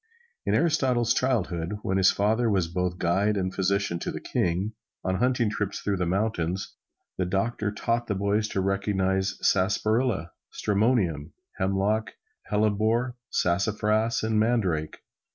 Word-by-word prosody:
In - - +3
Aristotle's 130 -8 +2
childhood, 100 -8 -1
when 95 - 0
his 95 -1 +5
father 110 +4 +2
was 95 -5 +1
both 90 +1 -2
guide 100 +5 +1
and 95 -1 -1
physician 95 -2 0
to - - -4
the - - -4
king, 90 +5 -1 0.3
on 95 0 0
hunting 125 +1 +2
trips 105 -2 -2
through 100 -1 -1
the 90 -1 -1
mountains, 95 -2 -1 0.5
the 90 - +1
doctor 105 +2 -1
taught 115 +3 -1
the 105 - -1
boys 100 +2 +1
to 95 - -2
recognize 95 0 0
sarsaparilla, 105 -1 +1 0.2
stramonium, 100 - 0 0.3
hemlock, 100 +3 0 0.4
hellebore, 110 +4 +1
sassafras 105 +5 +1
and 110 -1 +1
mandrake. 95 -9 0
100 Hz, 135 wpm, -26 LUFS, 95-110 Hz, 0.5 s, his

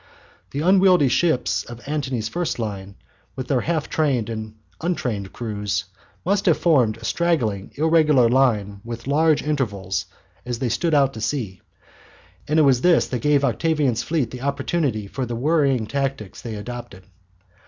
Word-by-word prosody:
The 140 - -3
unwieldy 185 -4 +5
ships 160 -4 +1
of 120 +2 -11
Antony's 135 -7 -2
first 175 +8 -2
line, 100 -4 -5 0.4
with 130 -1 -6
their 130 -3 +2
half 160 -2 -1
trained 130 -8 0
and 110 -1 -6 0.3
untrained 120 - -2
crews, 105 -4 -3 0.4
must 200 +2 +1
have 165 - +5
formed 130 -11 +3
a 115 - -10
straggling 120 - 0
irregular 155 -5 +4
line 110 -6 +1
with 115 0 -7
large 155 +3 +2
intervals 105 -11 -2 0.4
as 120 -1 -3
they 125 0 -1
stood 155 +7 +1
out 135 -2 +3
to 110 - -7
sea, 110 -6 -3 0.9
and 150 - +1
it 155 - +6
was 130 -3 +4
this 175 +1 +4
that 125 - -2
gave 145 -1 +3
Octavian's 140 -2 +1
fleet 150 -8 -1
the 125 - -7
opportunity 140 -4 -1
for 125 +5 -4
the 120 - -3
worrying 135 -3 +2
tactics 135 -5 -3
they 115 -2 -6
adopted. 120 -2 -8
130 Hz, 155 wpm, -22 LUFS, 110-150 Hz, 0.9 s, it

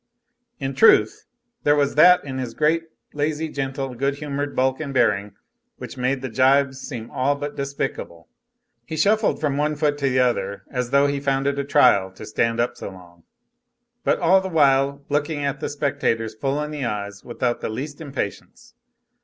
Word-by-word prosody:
In 135 -2 -3
truth, 110 -5 +4 0.4
there 145 0 +3
was 140 -1 +1
that 180 +4 +6
in 130 -2 -5
his 125 -3 -5
great, 165 +2 +1 0.3
lazy, 150 +2 -2
gentle, 135 -2 -4
good 140 +3 -1
humored 145 0 -4
bulk 130 0 +1
and 150 -3 -4
bearing 105 -4 +1 0.4
which - - -8
made 130 +1 -1
the - - -2
gibes 130 +2 +2
seem 115 -4 -7
all 140 +3 +1
but 145 0 -5
despicable. 135 - -4 0.6
He 160 - -6
shuffled 215 +3 +2
from 145 -3 -1
one 150 +1 0
foot 145 -1 0
to 140 -1 +1
the 130 - 0
other 100 -6 0
as 125 -2 -2
though 140 +2 +4
he 140 0 0
found 135 -1 0
it 140 0 0
a - - 0
trial 100 -9 +4
to 110 - -10
stand 115 +2 0
up 120 - 0
so - - -6
long, 90 -3 -16 0.8
but - - +2
all 190 0 +4
the 190 - -4
while 140 -3 +2
looking 145 0 -1 0.2
the - - -3
spectators 115 -6 -1
full 135 +6 -2
in 150 - -5
the 150 -2 -4
eyes 100 -3 -4
without 120 0 -2
the - - -3
least 145 +7 -6
impatience. 150 - -6
140 Hz, 180 wpm, -22 LUFS, 120-145 Hz, 0.8 s, that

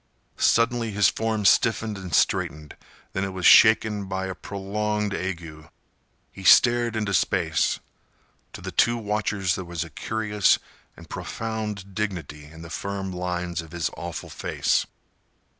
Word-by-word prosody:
Suddenly 115 0 +2
his 105 -1 +3
form 110 -2 -2
stiffened 110 +2 +3
and 95 -3 -8
straightened. 75 -1 0 0.4
Then 95 - -1
it 95 -1 -3
was 90 -2 -4
shaken 110 -2 +6
by 95 0 -3
a 95 - -4
prolonged 105 +2 -3
ague. 85 -5 -5 0.6
He 95 - -11
stared 120 +4 +5
into 105 -2 -1
space. 85 -3 +1 0.7
To - - -9
the - - -6
two 120 0 +3
watchers 105 -4 -1
there 95 - -4
was 85 -1 -4
a 80 - -11
curious 105 +1 +1 0.4
and - - -13
profound 105 -3 -5
dignity 85 -8 -4
in 80 +2 -12
the 80 - -10
firm 100 0 -4
lines 90 -1 -3
of 80 0 -14
his 85 -2 -2
awful - - -7
face. - - 0
100 Hz, 140 wpm, -25 LUFS, 90-105 Hz, 0.7 s, shaken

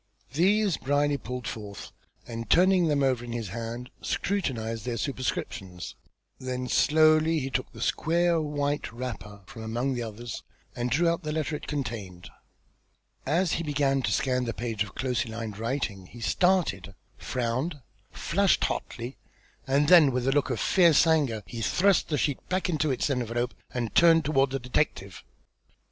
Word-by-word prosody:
These 195 +3 +3
Brierly 145 +1 +1
pulled 125 0 -6
forth, 105 -2 -7 0.3
and 115 -2 -6
turning 180 - +5
them 145 -2 +2
over 130 -3 +1
in 120 -1 -6
his 115 -4 -4
hand, 115 +4 -6
scrutinised 115 - -2
their 120 0 -3
superscriptions. 100 - -4 0.5
Then 130 0 -4
slowly 155 +2 +4
he 135 -2 -3
took 130 - -2
the - - -11
square 170 0 +2
white 145 -1 -2
wrapper 115 -4 -7
from 110 - -10
among 120 +5 -1
the 120 - -3
others, 115 +1 -6 0.3
and 120 0 -2
drew 165 +7 +2
out 170 +1 +1
the 150 -2 -4
letter 155 0 -1
it - - -8
contained. 110 -11 -5 1.0
As 170 +1 +2
he 170 - -1
began 140 -3 +1
to - - -1
scan 125 -1 +1
the 115 - -3
page 115 -3 -2
of 100 - -12
closely 125 -2 -1
lined 110 -2 -6
writing 115 -6 -3
he 120 - -13
started, 115 - +1 0.2
frowned, 125 - -2 0.3
flushed 195 +2 +1
hotly, 120 +3 -3 0.5
and 140 +2 +3
then 165 -5 +7
with 125 0 -1
a - - +4
look 145 0 +1
of 125 -4 -2
fierce 170 -5 +5
anger 145 -10 +2
he 115 +4 -7
thrust 180 - +2
the 150 - 0
sheet 145 -2 0
back 185 0 0
into 155 -2 +1
its 130 -3 0
envelope, 120 -1 -1 0.2
and 120 -3 -3
turned 165 -2 +6
toward 140 -2 +3
the 135 - -2
detective. 125 -1 -2
130 Hz, 160 wpm, -27 LUFS, 115-155 Hz, 1.0 s, then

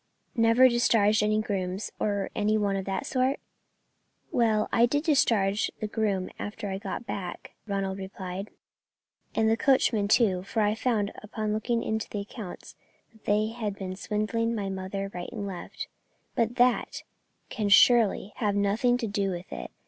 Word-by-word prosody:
"Never 230 +2 +6
discharged 225 -4 +3
any 215 0 +2
grooms, 190 -1 -3
or 200 -2 -1
any 215 0 +2
one 200 -2 +1
of 195 -1 -3
that 195 +7 -2
sort?" 260 0 +1 0.9
"Well, 220 -3 +2
I 235 +1 +5
did 290 +4 0
discharge 220 - +2
the - - -2
groom 205 -3 -1
after 205 0 -5
I 190 - -3
got 235 - -5
back," 185 -5 -6 0.2
Ronald 195 -1 -2
replied, 190 0 -6 0.9
"and 220 - +3
the 220 - +4
coachman 230 -5 +3
too, 200 -4 +3
for 200 +4 -2
I 210 0 +2
found, 220 -3 0
upon 210 0 -3
looking 230 +2 0
into 220 -1 -2
the 205 - -3
accounts, 200 -2 -9 0.4
that 220 -1 -24
they 210 +1 +2
had 220 -3 -4
been 185 -2 -5
swindling 215 +3 -1
my 200 -3 -2
mother 195 +1 -4
right 175 0 -5
and 205 -3 -5
left; 190 -3 -6 0.5
but 230 0 0
that 250 -1 +2 0.5
can 210 -4 -2
surely 210 -1 +5
have 205 -3 0
nothing 210 +5 +2
to 235 -2 -3
do 200 -1 0
with 180 -1 -6
it. - - -6
210 Hz, 165 wpm, -28 LUFS, 195-230 Hz, 0.9 s, Never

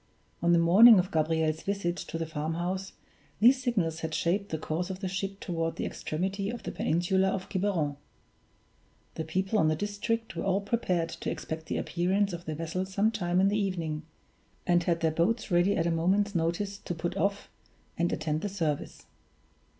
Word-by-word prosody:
On 170 - +3
the 170 - +6
morning 195 +7 +8
of 185 +2 +1
Gabriel's 160 -1 +1
visit 195 -3 -1
to 165 - -5
the 165 - -2
farmhouse 170 +5 -3 0.5
these 250 +5 +6
signals 190 -11 0
had 160 -1 -3
shaped 185 +6 0
the 160 - -2
course 160 +4 -3
of 185 -1 -5
the 190 - -3
ship 195 +1 -3
toward 165 -2 -2
the - - -3
extremity 195 +5 -3
of 235 0 -6
the - - -4
peninsula 190 +3 +1
of 190 -1 -2
Quiberon. 180 -8 0 1.2
The 160 - -4
people 190 +6 0
of 160 - +4
the 155 - +2
district 205 +5 -2
were - - -3
all 195 0 +1
prepared 185 -6 0
to - - -5
expect 160 0 -5
the - - -2
appearance 190 +3 0
of 175 0 -6
the 155 - -3
vessel 165 +3 -2
some 200 +3 +1
time 180 -5 0
in 195 +1 +4
the 210 +1 +1
evening, 165 -6 -2 0.6
and 175 -1 +3
had 170 -1 0
their 160 -1 +2
boats 210 +7 0
ready 175 +3 +3
at 165 - +1
a 170 - +1
moment's 190 +5 +1
notice 180 +4 -1
to 175 - -5
put 170 +2 -3
off, 200 +1 -1 0.5
and 170 +1 0
attend 155 0 -1
the 205 - -2
service. 160 -7 -3
180 Hz, 190 wpm, -29 LUFS, 165-200 Hz, 1.2 s, morning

